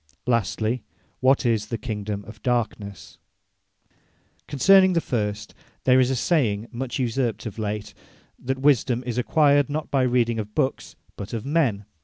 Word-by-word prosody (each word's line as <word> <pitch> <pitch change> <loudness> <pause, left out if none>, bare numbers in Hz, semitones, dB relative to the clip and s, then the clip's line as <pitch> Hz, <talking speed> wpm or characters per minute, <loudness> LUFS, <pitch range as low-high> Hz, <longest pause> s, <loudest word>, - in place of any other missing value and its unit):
Lastly, 115 0 0 0.4
what 130 +1 +3
is 110 -3 +1
the 115 - -3
Kingdome 105 -2 -5
of 110 0 -12
Darkness. 110 -6 -3 1.3
Concerning 190 +6 +5
the 170 - +3
first, 105 -7 -3 0.3
there 130 0 +5
is 130 -1 +3
a 135 - 0
saying 120 - 0
much 125 +1 -4
usurped 120 -2 -1
of 110 0 -6
late, 105 -1 -4 0.5
That 130 +1 -3
Wisedome 130 -3 +2
is 125 -1 -2
acquired, 145 +2 +3
not 155 +1 -4
by 135 - +2
reading 120 -2 +1
of 105 0 -6
Books, 130 - -1 0.2
but 100 - -8
of 115 +1 -4
Men. 135 -10 0
120 Hz, 150 wpm, -24 LUFS, 110-135 Hz, 1.3 s, Concerning